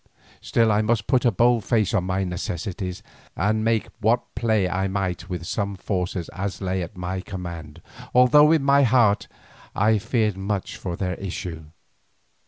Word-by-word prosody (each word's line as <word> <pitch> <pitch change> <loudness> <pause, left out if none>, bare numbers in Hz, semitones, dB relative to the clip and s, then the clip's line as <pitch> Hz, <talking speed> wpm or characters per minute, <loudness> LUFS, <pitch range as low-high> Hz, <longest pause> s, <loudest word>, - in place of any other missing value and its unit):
Still 115 -1 +2
I 105 +1 +3
must 110 -1 0
put 130 -2 +2
a 120 - +5
bold 120 +2 +3
face 110 -3 +1
on 95 -5 +1
my 95 +1 -1
necessities, 90 +2 -4 0.3
and 110 +4 +1
make 115 -1 +1
what 115 +2 +1
play 110 -4 +1
I 95 +2 -1
might 95 -2 -3
with 90 -2 -4
such 100 +1 -2
forces 90 -2 -3
as 95 +1 -4
lay 95 -1 -2
at 85 +1 -7
my 90 +1 -3
command, 85 -5 -8 0.3
although 140 +5 +6
in 160 -4 +3
my 140 0 +5
heart 115 -6 +3 0.5
I 110 +1 +3
feared 110 -2 0
much 100 0 -3
for 90 -2 -5
the 90 +1 -4
issue. 85 -4 -5
100 Hz, 165 wpm, -24 LUFS, 90-115 Hz, 0.5 s, although